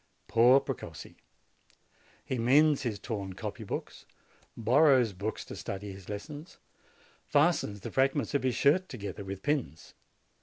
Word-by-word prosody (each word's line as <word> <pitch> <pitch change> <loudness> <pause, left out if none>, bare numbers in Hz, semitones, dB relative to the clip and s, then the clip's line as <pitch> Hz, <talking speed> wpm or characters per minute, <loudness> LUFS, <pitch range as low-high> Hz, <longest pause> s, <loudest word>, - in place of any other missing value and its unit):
Poor 120 +4 +6
Precossi! - - -7 1.1
He 130 - -2
mends 145 +5 +4
his 115 -5 -2
torn 100 -2 -5
copy 105 +3 -6
books, 100 - -6 0.5
borrows 125 -1 +4
books 100 +4 -4
to - - -8
study 100 +1 -6
his 95 -1 -12
lessons, 145 - -7 0.7
fastens 145 - +2
the - - -6
frag 135 +1 +2
ments 145 - -2
of 140 - +2
his 130 -2 0
shirt 170 +9 +3
together 100 -4 -6
with 95 0 -7
pins. 140 - -2
120 Hz, 140 wpm, -30 LUFS, 100-145 Hz, 1.1 s, Poor